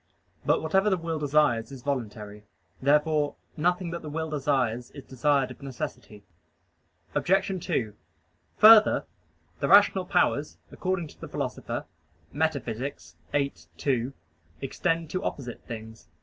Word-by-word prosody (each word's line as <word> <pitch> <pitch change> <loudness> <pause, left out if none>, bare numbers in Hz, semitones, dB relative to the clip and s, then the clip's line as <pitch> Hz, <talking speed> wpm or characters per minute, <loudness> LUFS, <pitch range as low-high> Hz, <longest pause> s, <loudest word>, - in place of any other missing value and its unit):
But - - +3
whatever 190 +6 +3
the 190 - +2
will 165 -2 -3
desires 145 -5 +2
is 130 -3 -10
voluntary. 105 -6 -4 0.4
Therefore 150 +1 +2 0.2
nothing 175 +2 0
that 170 - -5
the 155 - -7
will 160 +1 -3
desires 130 -5 0
is 140 - -8
desired 135 0 +1
of 130 - -12
necessity. 120 -5 -7 0.9
Obj. 195 +2 +2
2: 120 - -1 0.6
Further, 215 0 +8 0.5
the - - 0
rational 195 -2 +6
powers, 165 -5 +1
according 185 -4 -2
to - - -18
the - - -6
Philosopher - - -4 0.5
(Metaph. 140 -4 -1 0.4
viii, 140 -1 +1 0.2
2), 130 -1 0 0.5
extend 165 +4 -1
to 185 +1 -2
opposite 125 -4 -5
things. 110 -3 -8
145 Hz, 125 wpm, -27 LUFS, 125-165 Hz, 0.9 s, Further